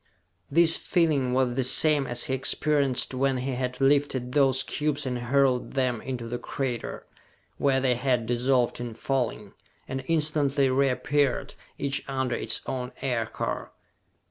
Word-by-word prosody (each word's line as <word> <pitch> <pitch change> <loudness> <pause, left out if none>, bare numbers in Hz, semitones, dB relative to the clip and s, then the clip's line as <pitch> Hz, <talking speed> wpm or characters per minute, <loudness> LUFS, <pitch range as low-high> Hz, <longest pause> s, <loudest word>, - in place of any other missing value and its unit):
This 165 +2 +7
feeling 150 -7 +1
was 130 -1 +1
the 130 +1 0
same 140 +2 +3
as 120 0 0
he 130 - -2
experienced 135 0 +1
when 135 0 0
he 130 +2 -3
had 125 0 -3
lifted 135 -2 +1
those 135 -1 +3
cubes 150 -1 -2
and 125 -1 -2
hurled 130 +1 +1
them 125 -4 0
into 125 -3 -5
the 120 +1 -4
crater 125 -1 -4 0.5
where 135 -2 +2
they 130 -1 +2
had 125 -1 0
dissolved 125 +1 +1
in 120 -2 -6
falling, 115 -5 -3 0.3
and 130 0 -4
instantly 150 -4 +1
reappeared, 135 +1 0 0.2
each 140 0 -1
under 130 -2 -2
its - - -2
own 125 -1 -4
aircar! 115 -4 -3
130 Hz, 145 wpm, -26 LUFS, 125-140 Hz, 0.5 s, This